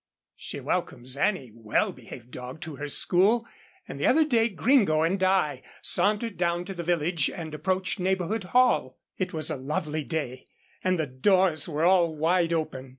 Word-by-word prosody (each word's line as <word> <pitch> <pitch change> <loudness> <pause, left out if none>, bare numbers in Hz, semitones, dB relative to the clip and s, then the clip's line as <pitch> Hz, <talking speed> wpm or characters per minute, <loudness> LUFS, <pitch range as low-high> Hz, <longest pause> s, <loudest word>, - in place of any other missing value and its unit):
She - - -6
welcomes 125 +2 -3
any 140 - 0
well 110 -2 0
behaved 120 +1 -12
dog 125 +4 -8
to 155 -4 -7
her 150 - -5
school, 200 +10 +3 0.4
and - - -7
the - - +2
other 315 0 +4
day 235 -5 +2
Gringo 195 - +3
and 185 +4 0
I 185 -5 +2 0.2
sauntered 210 0 +1
down 175 0 0
to 195 - -6
the 175 - -5
village 170 -2 +1
and 160 -4 -7
approached 185 +6 -1
Neighbourhood 190 +2 -1
Hall. 245 - +2 0.2
It 185 -1 -1
was 155 -2 -3
a - - -2
lovely 150 +3 -3
day, 140 -5 -4 0.4
and 185 -1 +2
the 160 - 0
doors 160 +4 +2
were 155 +1 0
all 175 -3 +4
wide 170 +2 +1
open. 145 -5 -3
170 Hz, 170 wpm, -26 LUFS, 150-190 Hz, 0.4 s, other